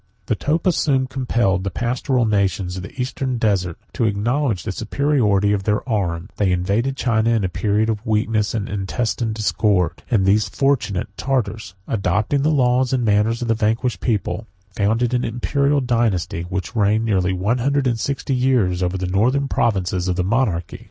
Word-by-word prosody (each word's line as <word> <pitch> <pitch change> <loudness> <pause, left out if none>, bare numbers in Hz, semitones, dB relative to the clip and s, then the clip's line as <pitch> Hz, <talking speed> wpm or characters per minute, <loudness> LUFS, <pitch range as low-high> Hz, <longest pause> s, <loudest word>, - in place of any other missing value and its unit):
The 110 - 0
Topa 160 - +1
soon 135 -4 +1
compelled 120 -7 0
the 100 - -1
pastoral 120 - 0
nations 100 -3 0
of 95 - -5
the 100 +7 -10
eastern 130 0 -2
desert 95 -7 0 0.2
to 120 - 0
acknowledge 110 - 0
the 110 - -3
superiority 110 -4 +1
of 100 - 0
their 105 +4 -1
arms; 95 -5 -1
they 100 -3 +2
invaded 100 +9 0
China 115 -3 +1
in 115 -3 +2
a 95 - 0
period 105 +3 0
of 110 -1 -2
weakness 110 -1 0
and 105 -3 -2
intestine 110 +3 -2
discord; 105 -4 0
and 105 -7 +2
these 105 +2 +3
fortunate 135 -9 0
Tartars, 110 -7 -2
adopting 105 +6 0
the 150 - +2
laws 125 -3 +2
and 125 -2 +1
manners 110 +3 +2
of - - -3
the 115 - +3
vanquished 115 +3 0
people, 110 -1 -2 0.2
founded 110 +5 0
an 125 0 +1
Imperial 140 +4 0
dynasty, 105 -9 0
which 95 +4 -4
reigned 110 +1 +2
near 100 -4 +2
one 105 +7 0
hundred 140 +2 +1
and 120 -3 0
sixty 140 +1 -2
years 125 -9 +1
over 90 +1 0
the 95 - -3
northern 120 +10 +1
provinces 95 -7 0
of 90 - 0
the 90 - 0
monarchy. 100 -4 -1
110 Hz, 175 wpm, -21 LUFS, 95-125 Hz, 0.2 s, these